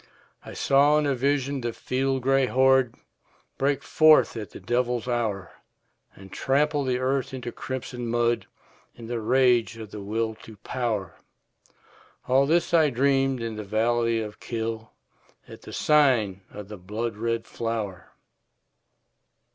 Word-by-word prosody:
I - - -10
saw 145 +2 +4
in 150 - +1
a 140 - +1
vision 140 +1 0
the 120 -1 -3
field 130 +1 -1
gray 135 0 +3
horde 130 -1 +3 0.6
Break 140 0 +1
forth 155 -4 +5
at 110 -3 -6
the - - -11
devil's 125 0 -1
hour, 110 -6 -2 0.6
And 95 0 -14
trample 145 +2 +1
the 130 -2 0
earth 130 0 -1
into 125 -2 -6
crimson 125 -2 -6
mud 120 0 0 0.5
In 115 - -10
the 115 0 -3
rage 120 -1 +2
of 110 -2 -9
the 105 - -7
Will 110 +2 -2
to 110 -2 -13
Power, 105 - -3 1.1
All 135 +2 +3
this 170 +2 +1
I 160 -3 +5
dreamed 135 -1 +1
in 115 -2 -4
the 105 - -5
valley 115 +2 +1
of 105 -1 -6
Kyll, 110 -1 -4 0.6
At - - -12
the - - -11
sign 125 -11 +2
of 105 -1 -9
the 105 0 -9
blood 105 +5 -4
red 115 +1 -2
flower. 110 -6 -4
120 Hz, 145 wpm, -25 LUFS, 110-135 Hz, 1.1 s, forth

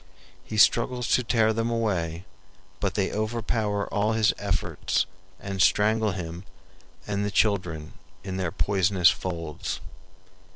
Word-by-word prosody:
He 110 - -6
struggles 120 +3 +3
to 125 - +3
tear 110 -1 +2
them 115 +1 -1
away, 95 -7 -1 0.5
but 100 -2 -1
they 100 -2 0
overpower 110 -1 -1
all 105 +2 +1
his 110 -1 +3
efforts - - 0 0.3
and 95 -1 -3
strangle 105 +2 +3
him 85 -1 -6 0.6
and 100 -1 -1
the 105 - 0
children 90 -8 0 0.3
in 95 -1 -4
their 90 -3 -1
poisonous 95 -2 +3
folds. 85 -4 -4
100 Hz, 125 wpm, -26 LUFS, 90-110 Hz, 0.6 s, struggles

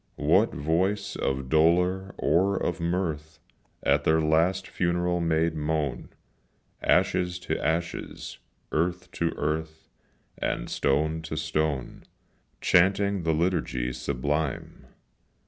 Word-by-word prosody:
What - - +3
voice 90 +8 0
of 65 -1 -2
dolour 90 +6 +2
or 95 +3 +2
of 85 - -2
mirth 85 -2 -2 0.5
At 70 +1 +3
their 80 +1 +3
last 80 +5 +2
funeral 90 0 0
made 80 0 +1
moan, 75 -2 -2 0.7
Ashes 90 -1 +2
to - - -3
ashes 85 +1 -3 0.3
earth 85 +3 -1
to 85 - 0
earth, 80 +1 -3 0.5
And - - -2
stone 80 +3 +1
to 80 -1 -5
stone, 75 -4 -2 0.6
Chanting 100 +2 +3
the 80 -1 +1
liturgy 80 -8 0
sublime. 70 +3 -3
80 Hz, 105 wpm, -27 LUFS, 75-90 Hz, 0.7 s, What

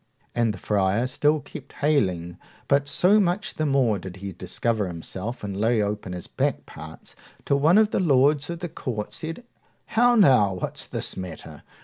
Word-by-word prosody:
And 115 -2 +1
the 105 - -7
friar 100 +4 +1
still 145 +4 +1
kept - - -11
haling, 90 - 0 0.3
but 140 0 +2
so 185 +8 +4
much 190 +1 0
the 155 -4 -1
more 130 -7 +2
did 90 0 -8
he 95 0 -7
discover 100 +4 -2
himself 95 +7 -6
and 100 -1 -4
lay 110 +3 +1
open 105 -3 -2
his 90 -1 -6
back - - -2
parts, 80 0 -11 0.3
till 140 - +2
one 160 +7 +5
of 215 0 +4
the - - 0
lords 145 -2 +3
of 170 -1 -5
the 175 - -3
court 110 -8 -5
said, 165 +10 -5 0.4
How 245 +2 +3
now! 125 - +5
what's 90 - -2
the - - -2
matter? 90 -1 -8
120 Hz, 175 wpm, -24 LUFS, 95-155 Hz, 0.4 s, one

